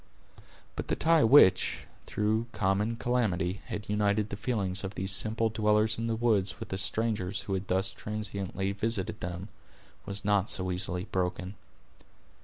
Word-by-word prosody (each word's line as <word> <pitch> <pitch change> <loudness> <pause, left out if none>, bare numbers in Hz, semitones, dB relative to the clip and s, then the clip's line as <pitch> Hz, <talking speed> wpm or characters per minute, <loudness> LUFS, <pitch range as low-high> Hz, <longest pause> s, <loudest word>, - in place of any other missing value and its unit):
But - - -5
the - - 0
tie 165 -1 +4
which, 110 -6 +5 0.3
through 110 +2 0
their - - -12
common 105 +3 +1
calamity, 100 -7 0
had 105 - -5
united 105 0 +1
the - - -2
feelings 100 -4 -2
of 95 +1 -5
these 95 +1 -1
simple 110 +3 +2
dwellers 110 0 +2
in 115 - -2
the 115 - 0
woods 110 -5 +1
with - - -7
the 95 - -2
strangers 100 -2 0
who 100 - -4
had 95 0 -3
thus 95 +1 +1
transiently 100 -2 -4
visited 100 -1 -2
them, 90 +3 -5 0.6
was 100 +1 -4
not 100 -1 +2
so 95 -1 0
easily 90 0 -2
broken. 90 +1 -2
100 Hz, 160 wpm, -29 LUFS, 95-110 Hz, 0.6 s, which